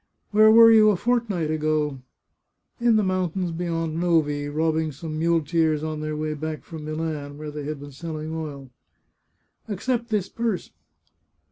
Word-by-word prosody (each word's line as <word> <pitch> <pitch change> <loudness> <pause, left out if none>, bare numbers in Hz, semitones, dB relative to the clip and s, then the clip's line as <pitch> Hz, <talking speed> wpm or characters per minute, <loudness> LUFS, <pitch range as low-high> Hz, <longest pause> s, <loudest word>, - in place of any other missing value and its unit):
" - - -47
Where 215 +1 +6
were 230 +1 +8
you 215 -1 +7
a 210 - +3
fortnight 210 -7 0
ago? 155 -3 0 0.3
" - - -53
" - - -47
In 235 -1 +4
the 215 - +3
mountains 185 -1 -1
beyond 165 -1 -2
Novi, 150 -4 +1
robbing 160 +1 0
some 155 +2 -6
mule 165 0 +2
teers 155 -1 +1
on 155 -1 -3
their 155 0 -3
way 155 0 -2
back 155 0 -5
from 160 -2 -9
Milan, 155 -2 -4
where 150 0 -6
they 150 -1 -6
had 150 -1 -4
been 145 0 -10
selling 155 +2 -6
oil." 145 -5 -6 0.5
" - - -46
Accept 235 +3 -2
this 210 -4 0
purse. 225 -3 -3
160 Hz, 175 wpm, -24 LUFS, 150-185 Hz, 0.5 s, were